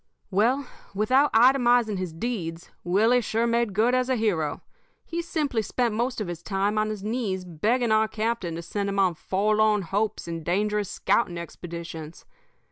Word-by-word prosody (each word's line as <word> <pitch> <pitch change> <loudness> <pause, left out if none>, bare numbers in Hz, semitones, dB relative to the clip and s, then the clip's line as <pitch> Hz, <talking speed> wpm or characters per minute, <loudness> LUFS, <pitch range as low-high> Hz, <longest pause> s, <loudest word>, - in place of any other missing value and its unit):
"Well, 240 +8 +2 0.3
without 255 +8 +3
itemizing 240 -3 +4
his 185 -2 -3
deeds, 170 -3 -4
Willie 220 +8 +3
sure 225 +1 0
made 235 -3 0
good 230 +4 +3
as 255 0 +1
a 260 - +2
hero. 175 -10 -1 0.4
He 340 0 -3
simply 300 -8 -1
spent 235 +2 -1
most 240 +3 -1
of 210 - -3
his 175 -1 -6
time 200 +3 0
on 215 0 0
his 210 -2 -5
knees 210 -5 -2
begging 220 +8 0
our 220 0 +4
captain 215 -6 -2
to 170 - -6
send 200 +3 -3
him 200 - -3
on 190 -3 +3
forlorn 210 +4 +1
hopes 205 +4 -2
and 165 -1 -5
dangerous 210 +3 0
scouting 175 -7 0
expeditions. 170 -2 -8
215 Hz, 165 wpm, -26 LUFS, 185-235 Hz, 0.4 s, itemizing